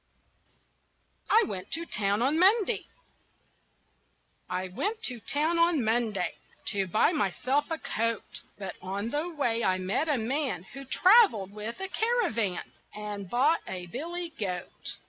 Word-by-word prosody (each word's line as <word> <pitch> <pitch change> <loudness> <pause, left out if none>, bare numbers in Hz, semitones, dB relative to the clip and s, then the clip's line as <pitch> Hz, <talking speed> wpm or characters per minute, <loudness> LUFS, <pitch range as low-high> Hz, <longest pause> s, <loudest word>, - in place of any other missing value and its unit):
I 455 - +6
WENT 185 -2 -5
TO 335 +1 -1
TOWN 205 -4 +1
ON 290 +5 +2
MONDAY 395 +3 +4 1.6
I 185 +1 -2
went 430 - -2
to 250 - -1
town 305 +9 0
on 335 -5 +3
Monday 220 -4 +1 0.4
To 195 -2 0
buy 215 - +3
myself 275 - +1
a 325 - -1
coat, 230 -5 -2 0.2
But 195 -3 -5
on 200 +4 -3
the 300 +4 -1
way 240 -8 0
I 185 0 +2
met 195 +12 -1
a 290 - +3
man 260 - -1
Who 275 0 -8
traveled 360 - +5
with 215 - -6
a 385 - -3
caravan, 370 - 0 0.2
And 205 -2 -6
bought 270 - +3
a 180 -2 -5
billy 335 - -5
goat. 180 -4 -4
240 Hz, 140 wpm, -29 LUFS, 200-330 Hz, 1.6 s, I